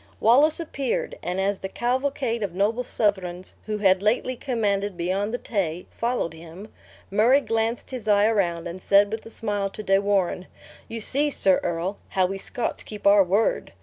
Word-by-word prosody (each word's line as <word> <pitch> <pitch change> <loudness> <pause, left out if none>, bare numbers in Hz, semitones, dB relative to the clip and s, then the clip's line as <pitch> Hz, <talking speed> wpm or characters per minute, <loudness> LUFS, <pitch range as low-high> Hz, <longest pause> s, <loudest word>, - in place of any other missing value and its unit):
Wallace 280 +9 +4
appeared; 280 -6 -3
and 180 +2 -3
as 195 0 0
the 190 - -5
cavalcade 250 0 -1
of 195 -4 -3
noble 210 +5 +1
Southrons 190 -6 -1
who 215 -1 -2
had 190 -2 +3
lately 235 +4 +1
commanded 205 -7 -1
beyond 190 +5 -1
the 245 - -1
Tay, 180 -8 -3
followed 235 -8 -2
him, 170 +5 -11 0.4
Murray 230 +7 +5
glanced 230 -2 -2
his 245 -4 -6
eye 205 -1 +4
around, 180 -6 +1
and 175 +2 -7
said 200 +2 +4
with 220 0 -5
a - - -9
smile 205 -3 -2
to 215 - -8
De 195 -1 +3
Warenne, 195 -2 0 0.4
"You 230 0 -6
see, 285 +7 +1
sir 190 -9 +3
earl, 175 +4 -3
how 190 -1 +2
we 195 +1 -3
Scots 240 - -4
keep 210 -1 -10
our 200 0 +7
word!" 195 +5 0
205 Hz, 180 wpm, -24 LUFS, 190-230 Hz, 0.4 s, our